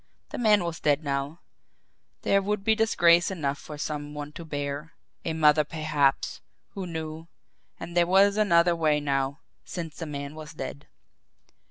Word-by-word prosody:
The - - -6
man 210 -5 +4
was 170 -2 -4
dead 150 +1 +2
now 140 +3 -3 0.8
there 200 - +3
would 205 0 -2
be 220 - +4
disgrace 175 -6 +4
enough 145 -7 -2
for 150 - -9
some 150 -1 -4
one 145 0 -6
to 170 - -9
bear, 145 0 -4 0.3
a 160 - -2
mother 150 -1 +5
perhaps 150 -2 0 0.3
who 190 -2 -5
knew! 160 -1 -6 0.5
And 170 - -7
there 175 -1 +4
was 195 +2 +5
another 175 -5 +4
way 155 -2 +2
now 140 0 -1 0.2
since 165 -4 -6
the 165 - -5
man 140 -1 -5
was 155 -1 -9
dead. 140 0 -7
155 Hz, 160 wpm, -27 LUFS, 145-175 Hz, 0.8 s, mother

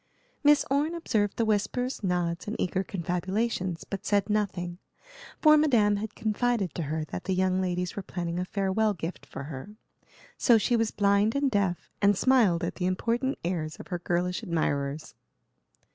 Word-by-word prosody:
Miss 295 0 +5
Orne 295 +4 +1
observed 215 -11 0
the 230 - +2
whispers, 220 +4 -1
nods, 175 -2 -1
and 210 - -3
eager 185 +1 0
confabulations, 185 +1 -2
but 195 - -6
said 205 0 +1
nothing, 185 -4 -1 0.6
for 305 -1 +7
Madame 230 -9 +3
had 215 +1 -5
confided 220 -4 0
to - - -3
her 155 0 -2
that 180 - -7
the 190 - 0
young 185 0 +2
ladies 180 -1 -2
were 200 - -3
planning 175 -2 -4
a 180 - -1
farewell 200 +2 0
gift 165 +1 -6
for 140 - -7
her. 150 +8 -8 0.6
So 235 -3 +6
she 230 +3 +1
was 225 -1 +2
blind 205 +3 +2
and 280 -1 +1
deaf, 195 -5 -1
and 200 -1 +4
smiled 215 -10 +3
at 170 - -3
the 180 - 0
important 235 +8 0
airs 165 -3 -2
of - - -12
her 175 -2 -2
girlish 175 +1 -1
admirers. 145 -3 -2
195 Hz, 170 wpm, -28 LUFS, 175-220 Hz, 0.6 s, for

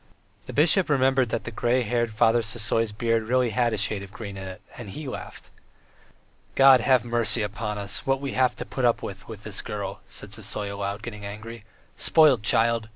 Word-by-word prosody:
The - - -6
bishop 165 +5 +4
remembered 135 -3 +2
that 115 - -2
the 115 - -6
grey 120 +3 +1
headed 120 0 -1
Father 115 +2 +3
Sisoy's 115 0 -1
beard 115 +1 -1
really 125 -1 +2
had 120 0 +1
a - - -2
shade 100 0 0
of 100 -1 -10
green 105 -2 -8
in 95 0 -7
it, 95 +1 -9 0.2
and 120 -5 -9
he 150 +9 -7
laughed. 130 - -8 1.0
"God 135 -2 +7
have 125 0 +3
mercy 120 -1 +2
upon 105 +1 -4
us, 100 +1 -4
what 135 0 0
we 140 0 -4
have 130 -1 +1
to 125 - -6
put 130 - -5
up 120 -1 +2
with 95 -1 -8
with 110 -2 -9
this 105 -3 -4
girl!" 100 -2 -6
said 100 - -9
Sisoy, 105 -1 -3
aloud, 100 +1 -4
getting 105 -4 -7
angry. 105 +2 -8 0.3
"Spoilt 150 -8 +5
child! 115 +1 +2
115 Hz, 200 wpm, -25 LUFS, 105-125 Hz, 1.0 s, God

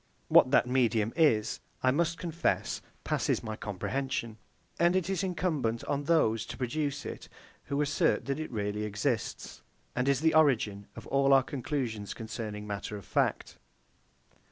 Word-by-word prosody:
What - - +7
that 135 - +4
medium 120 -4 +1
is, 120 -10 +3 0.2
I 130 - +5
must 165 +3 +1
confess, 170 -1 -1 0.2
passes - - 0
my 110 -1 -4
comprehension; 115 +3 -3 0.4
and 175 +1 +4
it 185 0 0
is 195 0 -1
incumbent 160 -11 -1
on 145 0 -2
those 115 -9 +3
to - - -7
produce 145 +2 -2
it, - - -7 0.4
who 140 - -2
assert 155 +3 +1
that 140 +2 -2
it 155 - -4
really 105 -1 -2
exists, 105 +4 -2 0.3
and 125 +2 +1
is 140 0 +2
the 160 0 +3
origin 115 -10 +3
of - - -9
all 135 0 +3
our 135 -1 +6
conclusions 130 -6 -3
concerning 110 -2 -5
matter 105 0 -4
of 100 - -11
fact. - - -1
130 Hz, 155 wpm, -30 LUFS, 110-150 Hz, 0.4 s, What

